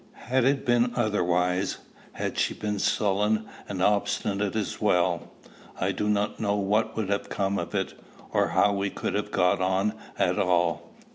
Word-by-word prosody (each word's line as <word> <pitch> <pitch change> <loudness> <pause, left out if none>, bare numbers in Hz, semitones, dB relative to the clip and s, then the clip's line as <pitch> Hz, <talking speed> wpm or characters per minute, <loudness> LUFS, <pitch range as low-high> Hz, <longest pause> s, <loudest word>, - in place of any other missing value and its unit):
Had 130 -1 +3
it 135 +1 +2
been 120 0 +3
otherwise, 90 -2 +1 0.4
had - - -3
she - - +1
been 105 -1 -3
sullen 105 +2 +1 0.2
and 95 -2 -2
obstinate 100 0 +1
as 110 -3 -3
well, 90 -4 +1 0.5
I - - +1
do 105 - -1
not 105 0 0
know 100 -1 +1
what 105 +3 0
would 105 -4 -1
have 100 0 -1
come 100 0 -1
of 85 +4 -5
it, 95 -1 -1 0.4
or - - +2
how 95 +4 +3
we 100 0 -1
could 95 - -3
have 105 +1 -1
got 90 -1 +2
on 95 +3 +1 0.2
at - - +1
all. 85 -2 +1
100 Hz, 165 wpm, -27 LUFS, 95-105 Hz, 0.5 s, Had